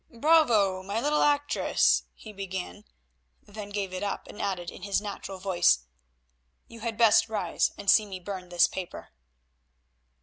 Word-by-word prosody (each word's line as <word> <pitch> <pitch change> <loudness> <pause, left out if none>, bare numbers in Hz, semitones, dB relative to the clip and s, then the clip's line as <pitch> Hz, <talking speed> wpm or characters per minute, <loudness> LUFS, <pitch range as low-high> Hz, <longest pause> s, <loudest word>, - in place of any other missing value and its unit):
"Bravo! 235 -9 +3
my 200 +4 -3
little 295 +4 +1
actress," 290 0 +2
he 215 - -12
began, 195 +1 -6 0.6
then 205 0 -9
gave 200 -2 -4
it 185 - -4
up 205 -1 -3
and - - -9
added 180 -3 -3
in - - -12
his 200 +1 0
natural 200 -2 -7
voice, 175 - +2 0.8
"you 230 - -13
had 225 -1 -4
best 225 -1 +5
rise 215 -2 0
and 200 - -10
see 215 +2 +5
me 190 -2 -7
burn 185 -1 -7
this 175 -1 +4
paper." 185 -2 -7
200 Hz, 155 wpm, -27 LUFS, 185-220 Hz, 0.8 s, best